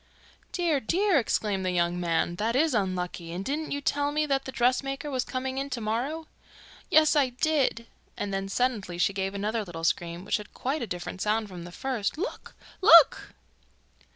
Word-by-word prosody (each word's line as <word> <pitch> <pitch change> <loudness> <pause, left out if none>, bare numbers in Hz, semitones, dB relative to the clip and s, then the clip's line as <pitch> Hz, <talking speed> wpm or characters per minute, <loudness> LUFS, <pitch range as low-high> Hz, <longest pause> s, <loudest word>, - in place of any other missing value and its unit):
'Dear, 335 -5 +1
dear!' 355 - +2
exclaimed 210 -5 -1
the 185 - 0
young 175 0 0
man. 170 0 0
'That 225 +4 0
is 305 +2 +3
unlucky; 180 -4 -2
and 180 +3 -5
didn't 305 +3 -2
you 285 - -2
tell 285 +1 0
me 305 +1 +1
that 275 -2 0
the 265 - -5
dressmaker 270 +4 0
was 255 -2 0
coming 260 0 -3
in 275 +1 -3
to 255 - -3
morrow?' 245 +9 -2 0.6
'Yes, 310 0 +5
I 280 -3 +3
did,' 260 -3 0 0.3
and 200 -1 -3
then 195 0 -2
suddenly 210 -6 -1
she 190 +3 +2
gave 195 0 -2
another 215 +3 -1
little 170 -4 -8
scream, 170 +2 -1
which - - +1
had 210 -1 -12
quite 270 +4 -2
a 235 - -3
different 180 +1 -6
sound 215 0 0
from 175 -2 -8
the 175 - -9
first. 250 +3 -2
'Look! 400 +9 -5 0.3
Look! 335 -5 +7
235 Hz, 185 wpm, -27 LUFS, 190-280 Hz, 0.6 s, Look